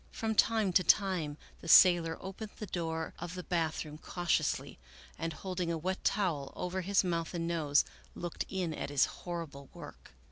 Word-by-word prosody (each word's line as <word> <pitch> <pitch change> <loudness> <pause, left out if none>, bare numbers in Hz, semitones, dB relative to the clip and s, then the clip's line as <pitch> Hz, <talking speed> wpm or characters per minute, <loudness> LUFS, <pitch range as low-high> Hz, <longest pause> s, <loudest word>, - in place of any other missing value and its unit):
From 220 -1 -2
time 220 -3 +3
to 185 - +5
time 175 -5 +2 0.2
the - - -10
sailor 170 -1 +7
opened 195 +3 -7
the 210 - -5
door 165 -3 -3
of 175 +1 -6
the 180 - -5
bathroom 160 -3 -2
cautiously, 175 0 -1 0.4
and, 165 0 -2
holding 180 0 -3
a 165 - -1
wet 185 +4 -3
towel 165 -9 0
over 180 +1 -2
his 195 +2 +2
mouth 170 -1 -2
and 165 -1 -1
nose, 155 -4 +2 0.3
looked 175 0 -4
in 180 -4 -2
at 145 - -4
his 145 -1 +4
horrible 160 -6 -7
work. - - -11
170 Hz, 170 wpm, -32 LUFS, 160-185 Hz, 0.4 s, sailor